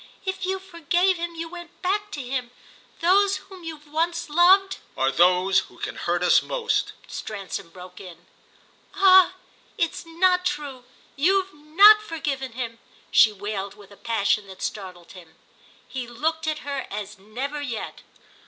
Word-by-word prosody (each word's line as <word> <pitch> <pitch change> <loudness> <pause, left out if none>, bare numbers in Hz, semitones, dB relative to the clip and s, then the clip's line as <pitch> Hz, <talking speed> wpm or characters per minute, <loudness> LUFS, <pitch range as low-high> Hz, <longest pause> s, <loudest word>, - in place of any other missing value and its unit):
If 380 -1 -3
you 380 0 0
forgave 360 0 0
him 340 0 -5
you 330 0 -5
went 345 0 -11
back 410 +3 0
to 290 - -4
him. 250 -1 -3 0.5
Those 395 +3 +4
whom 380 -2 -13
we've 315 -3 -8
once 335 +1 -2
loved—" 380 +4 +5 0.2
"Are 135 +1 +2
those 180 +4 +4
who - - -10
can - - -5
hurt - - -1
us - - +5
most," - - -1
Stransom 200 -3 -6
broke 180 +1 -12
in. 175 -2 -12 0.7
"Ah 375 -1 +6 0.4
it's 330 - -1
not 360 +2 +2
true—you've 295 +5 -2
not 375 +9 +6
forgiven 285 - -4
him!" 230 -2 -5 0.3
she 220 - +6
wailed 200 -1 -5
with 205 -1 -16
a - - -13
passion 210 -2 0
that 190 -1 -10
startled 180 -4 -6
him. 170 -4 -14 0.5
He 255 -2 -5
looked 315 +7 -2
at 310 -2 -3
her 280 -1 -3
as 205 0 -6
never 260 +9 -5
yet. 240 -6 -5
295 Hz, 150 wpm, -24 LUFS, -, 0.7 s, Ah